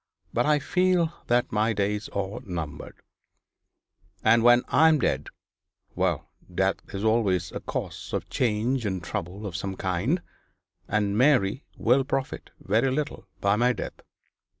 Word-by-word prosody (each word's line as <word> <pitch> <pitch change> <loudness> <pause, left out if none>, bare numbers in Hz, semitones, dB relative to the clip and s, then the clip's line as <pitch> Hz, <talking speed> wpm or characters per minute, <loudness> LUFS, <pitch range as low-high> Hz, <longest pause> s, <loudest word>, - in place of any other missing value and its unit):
But 120 +4 +1
I 150 0 +4
feel 180 +2 +2
that 120 0 +2
my 110 +1 +2
days 105 0 -1
are 100 0 -3
numbered 85 -6 -6 1.2
and 115 +1 +5
when 120 +1 +6
I 160 - +5
am 160 -1 +5
dead - - 0 0.7
well - - -1 0.2
death - - +1
is 100 +1 -4
always 100 -6 +2
a - - -4
cause - - -5
of - - -2
change 120 +2 0
and 95 -4 -2
trouble 95 +2 -5
of 95 -4 -5
some 100 0 -3
kind, 95 - 0 0.6
and 100 -1 0
Mary 125 -2 +3
will 125 +4 +3
profit 135 0 -3
very 115 +7 +2
little 145 +3 -3
by 100 +1 +3
my 125 +2 +3
death. - - -7
110 Hz, 145 wpm, -26 LUFS, 100-130 Hz, 1.2 s, when